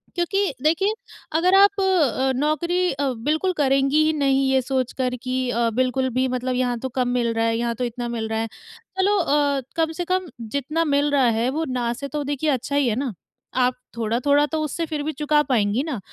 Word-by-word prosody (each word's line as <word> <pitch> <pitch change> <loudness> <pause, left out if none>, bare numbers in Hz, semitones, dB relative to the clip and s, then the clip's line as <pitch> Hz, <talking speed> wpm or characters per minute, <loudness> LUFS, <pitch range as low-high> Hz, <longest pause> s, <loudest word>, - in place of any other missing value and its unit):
क्योंकि 390 +3 0
देखिए, 360 +7 +2 0.4
अगर 355 +4 +3
आप 400 +1 +5
अ, 295 - +2
नौकरी 340 +6 +1
अ, 275 +1 -1 0.2
बिल्कुल 340 +5 +1
करेंगी 275 +2 +3
ही 315 - +2
नहीं, 275 -2 +2
ये 265 -1 +3
सोचकर 255 -1 -1
कि 255 0 -1
अ, 235 -1 +1
बिल्कुल 255 +1 +1
भी 260 - +2
मतलब 255 0 -2
यहाँ 250 -1 0
तो 260 - -4
कम 250 - +2
मिल 240 -2 0
रहा 225 0 0
है, 225 0 +1
यहाँ 235 0 -1
तो 250 - -3
इतना 240 0 -3
मिल 225 -2 -3
रहा 220 0 -1
है। 225 - -1 0.5
चलो 405 +2 +3
अ, 285 -5 +1
कम 320 -1 +1
से 350 - -1
कम 370 +1 -1 0.3
जितना 305 +4 0
मिल 285 0 +1
रहा 270 -3 +3
है, 240 +2 +1
वो 315 +4 -2
ना 245 -2 -1
से 280 +3 -6
तो 295 0 -3
देखिए, 290 +2 -1
अच्छा 270 +1 -1
ही 285 -3 +3
है 215 - 0
ना? 260 -3 -2 0.5
आप 250 0 +3 0.2
थोड़ा-थोड़ा 255 +6 +2
तो 315 - -1
उससे 315 +3 -2
फिर 305 -2 -2
भी 310 - -2
चुका 300 +1 +2
पाएँगी 225 -4 +1
ना। 290 -9 -4
275 Hz, 210 wpm, -23 LUFS, 250-310 Hz, 0.5 s, आप